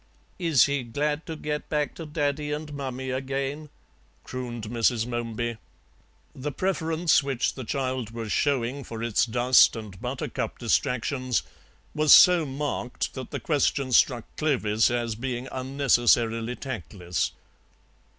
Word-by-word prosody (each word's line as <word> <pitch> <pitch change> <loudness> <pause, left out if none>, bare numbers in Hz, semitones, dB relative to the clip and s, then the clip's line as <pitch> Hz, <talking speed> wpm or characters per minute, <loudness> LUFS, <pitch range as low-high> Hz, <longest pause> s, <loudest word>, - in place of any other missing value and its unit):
"Is 165 -8 +4
he 140 -1 0
glad 145 +6 -2
to 160 - -4
get 150 -1 -4
back 150 -1 0
to 165 - -8
Daddy 150 -1 -1
and 150 0 -4
Mummy 130 -2 -4
again?" 135 +3 -3 0.5
crooned 120 -3 -6
Mrs. 115 +1 +1
Momeby; 120 -1 -3 0.7
the 145 +3 -4
preference 165 -1 +1
which 135 -3 -1
the 130 - -7
child 130 -1 -2
was 115 -2 -6
showing 135 -1 0
for 115 -1 -6
its 115 0 +2
dust 125 +3 +5
and 105 -4 -8
buttercup 125 +1 -3
distractions 125 +1 0 0.5
was 155 -1 +3
so 180 -4 +7
marked 135 -2 -3
that 130 -2 -7
the - - -4
question 140 -3 0
struck 120 -1 +4
Clovis 115 -8 +2
as 120 -1 -1
being 125 +2 -4
unnecessarily 120 -3 +2
tactless. 90 - -3
130 Hz, 130 wpm, -26 LUFS, 120-145 Hz, 0.7 s, so